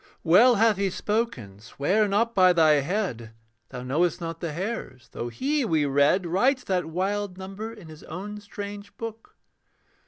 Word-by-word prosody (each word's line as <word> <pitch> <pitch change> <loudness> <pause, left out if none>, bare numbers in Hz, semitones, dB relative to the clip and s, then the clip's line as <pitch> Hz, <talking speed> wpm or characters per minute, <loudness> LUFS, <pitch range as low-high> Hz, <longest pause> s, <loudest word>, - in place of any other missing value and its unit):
Well 220 +9 +6
hath 220 -1 +3
He 200 -1 +1
spoken: 185 - -3
'Swear 165 - 0
not 230 +4 +1
by 185 -3 +5
thy 155 -4 +5
head, 135 - -3 0.3
Thou 125 -1 -7
knowest 155 +7 0
not 165 -1 -5
the 170 -2 -3
hairs,' 170 - -5
though 120 - -5
He, 280 - -1
we 160 -9 +1
read, 145 +7 +3
Writes 250 +10 +2
that 180 -3 -1
wild 190 +3 -2
number 195 +4 -7
in 210 -7 -12
his 155 -1 -12
own 200 +6 -7
strange 205 0 -8
book. 225 -1 -8
190 Hz, 160 wpm, -26 LUFS, 155-210 Hz, 0.3 s, Well